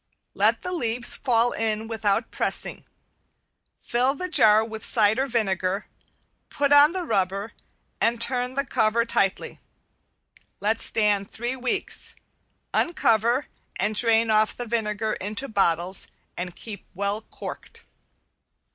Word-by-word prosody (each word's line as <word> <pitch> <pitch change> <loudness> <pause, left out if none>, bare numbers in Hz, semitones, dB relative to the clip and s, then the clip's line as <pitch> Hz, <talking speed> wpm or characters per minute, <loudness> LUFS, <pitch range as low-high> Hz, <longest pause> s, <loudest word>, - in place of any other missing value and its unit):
Let - - +2
the 360 - -3
leaves 240 -8 +1
fall 240 -1 +2
in 220 0 -1
without 220 0 -1
pressing. - - -3 0.9
Fill 255 +3 +1
the 365 +5 -4
jar 220 -10 +5
with 220 -1 -7
cider 220 +4 +3
vinegar, 195 -4 -1 0.6
put 285 0 +1
on 290 +3 +7
the 370 -1 -2
rubber, 195 - -1 0.5
and 230 0 +2
turn 250 +1 +1
the 275 +1 0
cover 230 -1 +1
tightly. 195 -5 -1 1.0
Let 220 +2 0
stand 205 -3 +2
three 240 +3 -3
weeks, 255 -1 -2 0.6
uncover, 235 - +2 0.3
and 210 +3 -1
drain 225 0 +3
off 215 0 +2
the 245 - -3
vinegar 220 -1 -1
into 210 +7 -3
bottles 185 -3 +1 0.3
and 180 0 -5
keep 205 -4 -9
well 200 +3 -1
corked. - - -9
225 Hz, 120 wpm, -24 LUFS, 210-245 Hz, 1.0 s, on